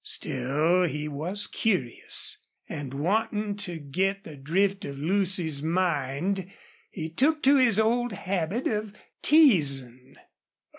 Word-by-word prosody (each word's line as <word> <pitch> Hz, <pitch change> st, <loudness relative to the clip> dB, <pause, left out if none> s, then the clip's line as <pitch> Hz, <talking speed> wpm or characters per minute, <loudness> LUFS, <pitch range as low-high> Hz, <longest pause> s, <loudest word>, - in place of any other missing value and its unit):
Still 150 Hz, +8 st, 0 dB
he 150 Hz, -1 st, -3 dB
was 170 Hz, +8 st, -2 dB
curious, 165 Hz, -, -1 dB, 0.3 s
and, 140 Hz, -3 st, -6 dB
wanting 205 Hz, +7 st, -1 dB
to 180 Hz, -5 st, -4 dB
get 190 Hz, +7 st, -2 dB
the 155 Hz, -, -10 dB
drift 190 Hz, +8 st, 0 dB
of 140 Hz, -1 st, -6 dB
Lucy's 175 Hz, -2 st, +2 dB
mind, 175 Hz, +2 st, -1 dB, 0.4 s
he 160 Hz, -3 st, -5 dB
took 285 Hz, -, +1 dB
to 280 Hz, +2 st, +6 dB
his 235 Hz, -6 st, +4 dB
old 240 Hz, +2 st, +1 dB
habit 190 Hz, +3 st, -2 dB
of 210 Hz, -2 st, -2 dB, 0.3 s
teasing. 140 Hz, -, +3 dB
180 Hz, 115 wpm, -26 LUFS, 145-205 Hz, 0.4 s, to